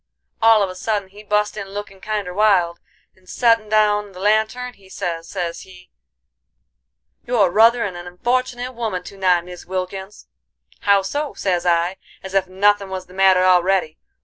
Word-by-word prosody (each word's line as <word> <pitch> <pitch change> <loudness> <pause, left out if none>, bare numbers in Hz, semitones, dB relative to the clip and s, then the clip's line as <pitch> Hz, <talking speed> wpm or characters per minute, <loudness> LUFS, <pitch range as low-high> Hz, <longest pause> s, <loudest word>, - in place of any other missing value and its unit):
All 225 -2 +6
of 195 - -1
a - - -8
sudden 200 +1 -2
he 205 +2 -13
bust 210 0 0
in 200 -2 -6
lookin' 195 -1 -8
kinder 205 -3 -3
wild, 185 -4 +2 0.4
and 185 -1 -23
settin' 230 -3 +2
down 210 -1 +2
the 180 - -11
lantern, 220 +5 0
he 195 -4 -21
sez, 165 -3 -4
sez 175 -3 -4
he: 180 -1 -16 1.4
'You're 215 -7 +3
ruthern 225 -1 +4
an 175 0 -8
unfortinate 250 +6 -2
woman 220 -7 -3
to 200 - -11
night, 180 -2 +2
Mis 180 -1 -11
Wilkins.' 190 +2 -5 0.5
'How 200 -1 +3
so?' 290 +8 -3
sez 180 -2 -1
I, 175 +2 +1 0.3
as 190 0 -8
ef 195 -1 +2
nuthin' 200 +1 +2
was 185 -1 -5
the 180 - -17
matter 190 -1 +4
already. 185 -2 +2
195 Hz, 165 wpm, -20 LUFS, 185-215 Hz, 1.4 s, All